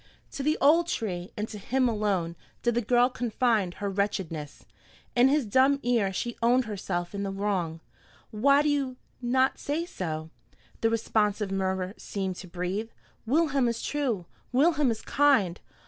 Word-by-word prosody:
To 285 - -5
the 305 +3 +1
old 325 +5 +5
tree, 185 - -3
and 210 +1 -2
to 210 - -7
him 255 +5 +1
alone, 200 -7 0 0.3
did 240 - +2
the 240 - +1
girl 245 +2 +4
confide 230 -6 0
her 205 - -3
wretchedness. 190 -7 -3 0.5
In 245 +1 +6
his 285 -1 +2
dumb 260 +6 +4
ear 230 -5 +2
she 235 +5 -3
owned 245 +2 +3
herself 185 -4 -3
in 200 - -3
the 200 - -2
wrong. 195 -5 -2 0.5
"Why 280 +7 +4
do 300 - +2
you 275 -3 -1 0.2
not 260 +2 +2
say 310 +4 -2
so?" 160 - -5 0.5
the 225 - +3
responsive 210 -2 0
murmur 190 -1 -1
seemed 190 -2 -4
to 185 - -8
breathe. 180 +5 -3 0.4
"Wilhelm 280 -2 +2
is 235 -1 -2
true! 250 -11 -1 0.3
Wilhelm 295 +1 +3
is 225 -2 -3
kind! 255 -12 +3
220 Hz, 160 wpm, -28 LUFS, 190-260 Hz, 0.5 s, In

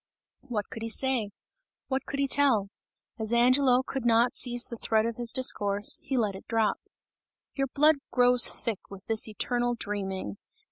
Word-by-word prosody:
What 215 -5 -4
could 225 - -8
he 225 - -4
say? 250 -3 0 0.6
What 265 -1 -3
could 280 - -4
he 280 - +2
tell? 260 -8 +3 0.5
As 220 0 -4
Angelo 255 +2 +3
could 270 -1 -5
not 235 +1 +3
seize 245 -1 +1
the 235 - -6
thread 220 0 0
of 230 -1 -4
his 240 -1 0
discourse, 205 -5 +2
he 265 - -3
let 215 -4 0
it 190 - -12
drop. 225 -2 0 0.8
"Your 275 -1 -2
blood 300 +4 +3
grows 245 -1 +4
thick 220 -4 -3
with 195 -1 -12
this 225 0 +1
eternal 240 +3 -2
dreaming! 200 -3 -5
235 Hz, 170 wpm, -27 LUFS, 215-255 Hz, 0.8 s, grows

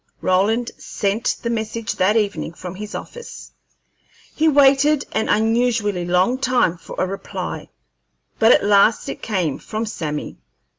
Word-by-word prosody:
Roland 215 +6 +1
sent 205 +2 -1
the 235 - -1
message 225 0 -3
that 205 +4 +2
evening 205 -6 -1
from 180 -1 -7
his 205 +2 -7
office. 480 -1 -9 0.8
He 315 - +2
waited 285 0 +4
an 220 - -1
unusually 220 -4 +1
long 180 +9 +2
time 250 -10 +1
for - - -10
a - - +1
reply, 195 +1 -6 0.7
but 225 +2 +6
at - - +4
last 205 +2 +4
it - - -6
came, 180 -9 -1
from 220 +1 -4
Sammy. 150 -8 -5
220 Hz, 140 wpm, -20 LUFS, 190-240 Hz, 0.8 s, but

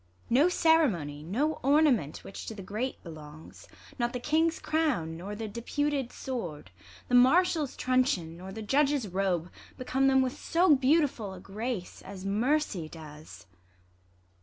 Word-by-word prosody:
No 285 +9 +5
ceremony, 245 - +2
No 255 - -1
ornament 275 - +2
which 195 - -9
to 220 - -5
the 195 - -8
great 220 +7 -4
belongs; 155 -2 -12 0.3
Not 240 0 0
the 250 - -3
King's 320 +5 +1
crown, 295 - -1
nor 195 +5 -6
the 220 +1 -5
deputed 270 +4 -2
sword, 175 - -6 0.4
The - - -6
martial's 300 +4 +4
truncheon, 250 -11 +1
nor 185 +2 -9
the 220 +2 -7
judge's 275 0 +2
robe, 180 -2 -1 0.3
Become 260 +1 0
tliem 270 - +3
w. 260 - +1
th - - -13
so 340 -2 +4
beautiful 260 - +1
a - - -10
grace 210 0 -5
As 195 -1 -9
mercy 215 - 0
does. 155 -1 -12
240 Hz, 145 wpm, -29 LUFS, 180-290 Hz, 0.4 s, No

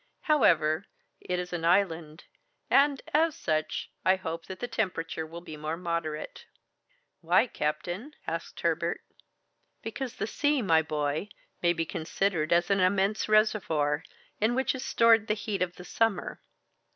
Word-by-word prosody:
However, 165 - +3 0.3
it 180 - -3
is 180 0 -4
an 170 -2 -3
island, 170 -3 +1 0.5
and 280 0 +4
as 320 +1 +3
such, 155 -1 -2
I 185 - +5
hope 165 -3 -5
that 185 -1 -7
the 245 - -3
temperature 175 -8 -2
will 170 +2 -9
be 160 -3 -9
more 155 +2 -3
moderate." 170 - -4 0.7
"Why, 175 +7 +4
captain?" 175 - -3
asked - - -5
Herbert. - - 0 0.8
"Because 245 +2 -5
the - - -2
sea, 290 +3 +1
my 165 -4 +4
boy, 150 +4 -2 0.3
may 175 0 +3
be 165 -1 -1
considered 160 0 -1
as 175 +2 +3
an 195 - +3
immense 195 +3 +2
reservoir, 165 -9 +2 0.4
in 220 +3 +2
which 265 +1 +1
is 260 -1 -5
stored 230 -3 +4
the 215 - +1
heat 205 -2 -3
of 180 -1 -1
the 180 - -11
summer. 225 -4 -1
180 Hz, 150 wpm, -29 LUFS, 160-220 Hz, 0.8 s, I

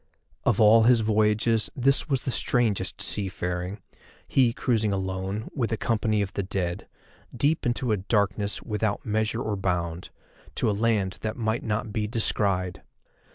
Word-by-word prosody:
Of 120 -3 +2
all 110 +1 +6
his 120 -2 +5
voyages 110 +1 +2
this 135 +4 +3
was 135 -3 0
the 130 - 0
strangest 120 -5 0
seafaring, 90 0 -2 0.5
he 130 -3 +3
cruising 115 -4 0
alone, 95 +2 -3
with 120 -6 -1
a 115 - 0
company 110 -2 0
of 95 -1 -6
the - - -1
dead, 90 -2 -3 0.5
deep 145 +2 +1
into 120 0 0
a 105 - +2
darkness 100 +1 0
without 105 -1 -2
measure 110 +2 -1
or 110 -1 -2
bound, 90 -3 -2 0.5
to - - 0
a - - +3
land 105 -2 0
that 110 +2 -3
might 110 -1 -1
not 105 -1 -3
be 105 -1 -1
descried. 100 -5 0
105 Hz, 155 wpm, -26 LUFS, 95-115 Hz, 0.5 s, all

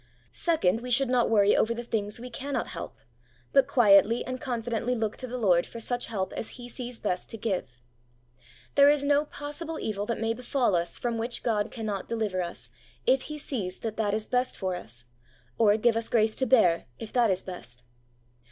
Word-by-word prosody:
Second, 235 - +1
we 250 - -6
should 255 +1 +4
not 250 -2 +3
worry 205 -2 +5
over 230 +1 +2
the 240 - -5
things 210 -2 -3
we 250 +1 -8
cannot 275 +3 -3
help, 165 - -7 0.6
but 275 -1 +5
quietly 215 -1 +5
and 255 +1 -5
con 245 -5 -2
fidently 240 +1 -1
look 220 -1 -1
to 255 - -5
the 250 +1 -4
Lord 180 -7 +3
for 230 - -8
such 245 +2 -1
help 195 -4 -3
as 225 - -6
He 245 -1 -8
sees 245 -1 -5
best 180 -5 -3
to 225 - -5
give. 180 - -3 0.9
There 280 0 +7
is 290 -1 +3
no 290 +1 +3
possible 300 +3 -6
evil 205 -1 -3
that 235 - -2
may 225 0 0
befall 245 -3 0
us 170 0 -1
from 235 -2 -2
which 235 +2 -2
God 215 -3 0
can 225 -3 -6
not 200 -3 -3
deliver 215 -5 -1
us, 170 -9 -5 0.3
if 260 +2 +2
He 300 - -5
sees 215 -11 -3
that 220 -2 -4
that 210 -2 +1
is 215 0 -3
best 250 0 0
for 185 -2 -2
us, 120 -8 -8 0.5
or 210 -2 +5
give 230 +1 +3
us 230 0 -2
grace 220 -1 +2
to 260 - 0
bear, 200 -10 +4
if 220 - -8
that 240 -3 +4
is 190 -1 0
best. 125 -10 -9
230 Hz, 205 wpm, -28 LUFS, 205-250 Hz, 0.9 s, There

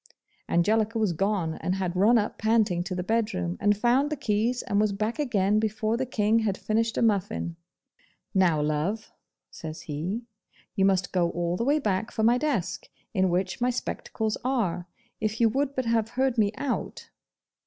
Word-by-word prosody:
Angelica 215 +6 +2
was 215 -5 +1
gone, 190 -2 0
and 185 - 0
had 185 -2 -2
run 215 +6 +5
up 210 -1 -1
panting 215 -5 +2
to 185 0 -4
the 180 - -2
bedroom, 185 - -1
and 205 0 +3
found 250 +6 +3
the 305 - -1
keys, 240 -2 0
and 200 +1 +1
was 215 -1 +2
back 215 +6 -2
again 210 -7 +2
before 220 +1 0
the 260 +2 -2
King 220 -2 +2
had 210 -4 -1
finished 225 +1 0
a - - +2
muffin. 200 -5 0 0.8
'Now, 175 -6 +3
love,' 155 +9 -1 0.4
says 160 0 -7
he, 170 +10 -4 0.5
'you 195 -2 +3
must 190 -2 +2
go 175 -2 +2
all 175 0 -1
the 230 - -1
way 290 +3 +3
back 210 -6 -1
for 220 - -2
my 240 +3 +4
desk, 245 - -2 0.2
in 190 0 +2
which 185 +4 -1
my 245 - +3
spectacles 220 -3 -3
are. 195 -10 -1 0.3
If 215 0 -2
you 230 -1 +5
would 275 +4 -1
but 260 - -1
have 225 -1 +1
heard 265 -2 +2
me 210 -3 +2
out. 280 -3 -4
210 Hz, 180 wpm, -27 LUFS, 185-230 Hz, 0.8 s, run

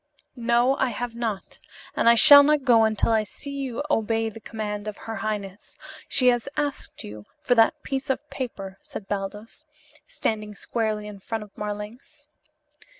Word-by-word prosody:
"No, 240 +2 +2
I 260 - +2
have 245 -1 -4
not; 225 -4 -4 0.4
and - - +4
I 235 - +7
shall 285 +4 +10
not 295 0 +3
go 235 -4 +5
until 220 +1 +1
I 220 -1 +4
see 245 +7 -7
you 275 -2 -4
obey 225 -4 0
the 225 - -11
command 210 -1 -5
of 210 - -5
her 225 0 -6
highness. 205 -1 -5 0.3
She 255 -2 +4
has 240 +2 0
asked 290 -2 -3
you 105 0 -10 0.2
for 245 - +3
that 245 +7 +3
piece 270 0 -3
of 270 +3 -1
paper," 195 -7 -6
said 195 - -9
Baldos, 205 +2 -5 0.4
standing 215 - -3
squarely 215 -1 -2
in 210 -1 -9
front 220 +2 -4
of 210 - -17
Marlanx. 210 +7 -7
225 Hz, 165 wpm, -25 LUFS, 210-255 Hz, 0.4 s, shall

